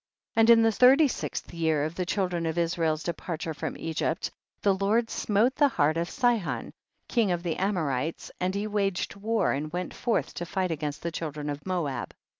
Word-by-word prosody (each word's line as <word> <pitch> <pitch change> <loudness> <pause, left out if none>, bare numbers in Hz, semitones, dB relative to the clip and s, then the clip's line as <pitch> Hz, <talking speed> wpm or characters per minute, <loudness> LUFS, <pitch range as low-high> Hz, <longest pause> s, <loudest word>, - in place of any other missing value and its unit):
14. 225 - +3
And 225 - +5
in 230 -1 +8
the 225 - +4
thirty 265 +7 +6
sixth - - -4
year 160 -3 +1
of 155 +2 -2
the 180 0 -3
children 180 -4 0
of 160 +1 -2
Israel's 165 -2 0
departure 165 -2 -4
from 145 - -4
Egypt 160 0 -2 0.3
the 200 - +4
Lord 210 +4 +1
smote 220 +5 +2
the 290 -1 +5
heart 155 - +2
of 170 +1 -1
Sihon, 240 -7 0 0.3
king 230 -5 +2
of 175 -1 -1
the 170 -3 -2
Amorites, 165 -6 -1
and 185 +1 0
he 200 +1 -1
waged 200 -4 -1
war, 220 +3 +1
and 150 +2 -2
went 180 +1 -3
forth 235 -2 -1
to 175 - -4
fight 185 -1 -1
against 150 -2 -3
the 170 - -2
children 150 -2 -4
of 145 +5 -7
Moab. 170 -7 -2
175 Hz, 195 wpm, -27 LUFS, 160-210 Hz, 0.3 s, in